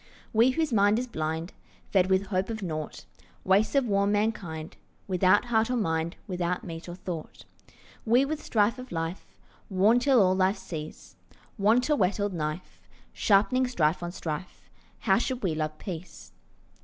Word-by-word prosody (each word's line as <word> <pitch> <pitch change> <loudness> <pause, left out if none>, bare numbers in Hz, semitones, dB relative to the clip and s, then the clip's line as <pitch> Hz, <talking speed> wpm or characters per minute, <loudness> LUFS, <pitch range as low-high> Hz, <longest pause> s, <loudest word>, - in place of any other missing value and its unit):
We 230 +3 +5
whose 295 0 0
mind 205 0 +4
is 250 - -1
blind, 160 -5 -4 0.4
Fed 185 -2 +3
with 190 +1 +2
hope 190 0 -1
of 220 -2 -4
nought; 155 -4 -5 0.4
Wastes 200 +7 +2
of 275 -2 +4
worn 200 -2 +2
mankind, 200 -7 -2 0.3
Without 185 +3 +3
heart 225 -1 +1
or 250 - 0
mind, 165 -6 -1
Without 180 +1 -2
meat 165 -3 -7
or 175 - -6
thought; 180 -3 -7 0.6
We 240 +4 +4
with 305 +2 -3
strife 220 0 +1
of 255 - -9
life 165 +2 -4 0.4
Worn 205 +5 +4
till 265 -1 +4
all 185 -2 +4
life 190 +2 +2
cease, 155 -2 -8 0.4
Want, 225 +5 +3
a 300 - +3
whetted 205 -2 0
knife, 155 +1 -5 0.3
Sharpening 235 +6 +3
strife 170 -10 +1
on 175 0 -4
strife, 160 -1 -6 0.3
How 195 0 +3
should 255 -1 -3
we 180 -5 +1
love 155 0 -3
peace? 160 - -8
195 Hz, 160 wpm, -27 LUFS, 170-225 Hz, 0.6 s, We